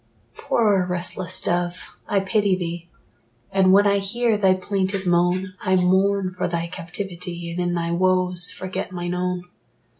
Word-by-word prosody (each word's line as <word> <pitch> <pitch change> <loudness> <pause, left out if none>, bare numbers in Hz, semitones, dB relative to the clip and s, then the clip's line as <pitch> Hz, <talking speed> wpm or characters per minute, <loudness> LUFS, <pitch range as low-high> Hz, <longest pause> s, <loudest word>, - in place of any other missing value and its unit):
Poor 205 -5 +2
restless 180 +1 -1
dove, 175 0 -2
I 200 - +2
pity 200 0 +2
thee; 175 -1 -5 0.6
And 190 -1 +4
when 200 +2 +6
I 200 0 +3
hear 225 +3 0
thy 190 -2 +3
plaintive 190 0 -2
moan, 180 +2 +1
I 185 - +2
mourn 190 +1 +2
for 180 - -2
thy 170 -1 -2
captivity, 175 0 -6
And 170 - -4
in 175 0 0
thy 170 0 -1
woes 180 0 +1
forget 185 +1 -5
mine 175 -1 -3
own. 180 0 -2
185 Hz, 150 wpm, -23 LUFS, 175-195 Hz, 0.6 s, when